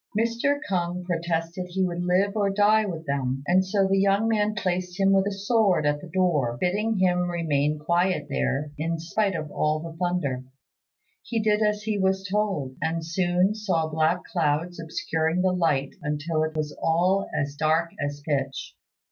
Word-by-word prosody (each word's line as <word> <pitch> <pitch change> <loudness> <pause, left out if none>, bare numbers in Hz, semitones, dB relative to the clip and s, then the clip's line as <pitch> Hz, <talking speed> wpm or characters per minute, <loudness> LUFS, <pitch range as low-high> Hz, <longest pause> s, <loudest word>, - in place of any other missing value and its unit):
Mr. 235 +5 +1
K'ung 180 -1 -1
protested 170 0 -2
he 190 +1 0
would 175 -1 -3
live 190 +3 +2
or 205 -2 +2
die 210 +2 +3
with 165 -3 -5
them, 135 -2 -2
and 185 +4 +4
so 195 +1 +1
the 195 0 +2
young 200 +3 +3
man 215 -1 +1
placed 180 -2 -2
him 195 0 +4
with 195 0 +3
a - - -1
sword 200 -4 +2
at 145 0 +1
the - - -9
door, 155 -10 +1
bidding 210 +5 0
him 180 -1 +2
remain 155 -3 0
quiet 170 +4 +1
there 140 +1 -1
in 165 +2 -1
spite 190 +4 -1
of 155 -2 -4
all 155 0 0
the 165 0 -8
thunder. 145 -8 -1 0.8
He 230 -1 -2
did 210 0 +2
as 210 0 +1
he 215 -2 -1
was 190 +1 +1
told, 190 -10 -1
and 160 0 -1
soon 180 +3 +1
saw 185 -7 -1
black 160 +3 +1
clouds 165 +1 -1
obscuring 160 +1 -1
the 185 -1 +2
light 150 -6 +1
until 150 +2 -1
it 155 0 -2
was 150 -1 -3
all 180 +4 +2
as 145 -1 -2
dark 160 +3 +1
as 145 0 -4
pitch. 135 -3 -2
175 Hz, 175 wpm, -25 LUFS, 155-195 Hz, 0.8 s, and